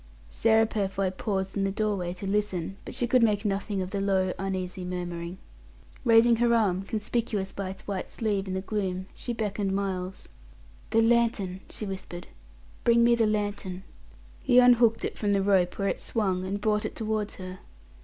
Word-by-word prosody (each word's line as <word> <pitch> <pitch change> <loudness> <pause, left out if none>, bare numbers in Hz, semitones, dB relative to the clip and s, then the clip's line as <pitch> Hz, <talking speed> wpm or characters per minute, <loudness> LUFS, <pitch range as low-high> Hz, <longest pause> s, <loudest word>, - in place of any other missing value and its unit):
Sarah 225 0 +4
Purfoy 195 -3 -1
paused 190 -1 -2
in 200 - 0
the 195 - +1
doorway 200 -3 -1
to 185 +2 -8
listen, 195 -2 -1
but - - -8
she 245 - 0
could 250 +1 +3
make 210 -2 +2
nothing 195 -1 -1
of 185 - -7
the 200 - -1
low, 190 -2 +1
uneasy 185 -1 -3
murmuring. 175 -1 -4 0.7
Raising 230 -1 +6
her 235 0 +3
arm, 195 -5 +2
conspicuous 210 -1 -2
by 195 -1 -4
its 190 0 -9
white 195 -2 -3
sleeve 205 -3 -1
in 185 - -3
the 190 - -1
gloom, 190 -2 -2
she 245 - -5
beckoned 205 -3 -1
Miles. 190 -1 -3 0.6
"The 225 0 +4
lantern," 225 -5 +2
she 215 - -6
whispered, 185 -3 -7 0.5
"bring 235 0 +5
me 235 0 +5
the 230 -2 +3
lantern!" 205 -3 -2 0.6
He 250 -2 +4
unhooked 240 -2 +6
it - - -5
from 205 -1 +1
the 195 -1 +2
rope 190 -3 +2
where 195 -1 0
it - - -2
swung, 190 -5 -1
and 200 +2 -2
brought 210 0 +1
it - - -4
towards 215 -1 -2
her. 185 0 -8
200 Hz, 180 wpm, -27 LUFS, 190-220 Hz, 0.7 s, Raising